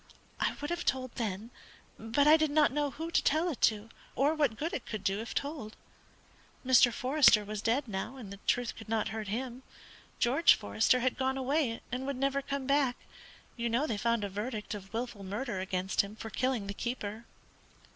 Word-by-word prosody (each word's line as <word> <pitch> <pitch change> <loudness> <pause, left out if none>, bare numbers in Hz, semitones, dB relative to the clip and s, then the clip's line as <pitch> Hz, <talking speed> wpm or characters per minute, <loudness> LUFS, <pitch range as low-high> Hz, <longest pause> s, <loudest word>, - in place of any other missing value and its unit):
I - - 0
would 290 +3 -4
have 345 0 -2
told 255 -2 -1
then, 220 -1 -4 0.5
but 225 +6 +1
I 305 - +9
did 310 -1 +2
not 300 0 +4
know 295 +1 0
who 325 +5 -6
to - - +2
tell 315 +5 +2
it 275 - -8
to, 215 0 -8 0.3
or 285 +4 +3
what 290 -8 +1
good 325 +3 -3
it 250 - -4
could 215 -3 -5
do 195 +1 0
if 225 +1 -6
told. 280 -7 -4 0.9
Mr. 255 -1 +6
Forester 255 -4 +4
was 210 0 -4
dead 245 +5 +1
now, 205 +5 -4
and 215 -7 -8
the 200 - -11
truth 245 -1 +1
could 225 -1 -11
not 225 -1 0
hurt 220 -1 -5
him. 245 +4 -4 0.6
George 275 +8 +5
Forester 105 - +2
had 255 +1 0
gone 265 0 0
away, 265 -3 0
and 255 +2 -3
would 280 -2 -2
never 275 +1 +1
come 275 -1 -4
back; 275 -2 +2 0.6
you 235 -1 -2
know 240 +6 +1
they 230 - -1
found 230 +1 0
a 200 - -2
verdict 210 +2 -4
of 195 -2 -8
wilful 230 -3 -4
murder 205 +2 -3
against 185 0 0
him 200 +1 -8
for 220 0 -8
killing 255 -4 0
the 200 - -4
keeper. 225 -1 -4
240 Hz, 200 wpm, -31 LUFS, 215-275 Hz, 0.9 s, I